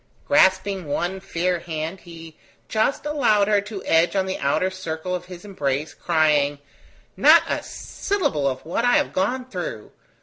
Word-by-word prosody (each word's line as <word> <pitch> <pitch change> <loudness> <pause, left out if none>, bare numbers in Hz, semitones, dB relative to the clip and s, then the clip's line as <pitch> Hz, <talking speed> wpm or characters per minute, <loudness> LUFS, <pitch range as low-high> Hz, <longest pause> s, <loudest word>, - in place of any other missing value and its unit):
Grasping 190 - +3
one 175 +6 -2
fair 180 -1 -1
hand, 160 +2 -5
he 165 -2 -12 0.3
just 220 +7 0
allowed 240 -9 +2
her 205 -1 +3
to 205 -1 -8
edge 165 +4 +3
on 190 -1 +1
the 190 - -4
outer 160 +7 +1
circle 180 -1 -5
of 180 -1 -4
his 180 +1 -11
embrace, 150 -6 -2
crying: 150 -4 +2 0.6
"Not - - +6
a - - -1
syllable 290 - -2
of 130 +1 -3
what 175 +8 -2
I 245 0 +3
have 295 -1 +2
gone 245 +7 -1
through! 180 - -6
185 Hz, 160 wpm, -23 LUFS, 160-205 Hz, 0.6 s, Not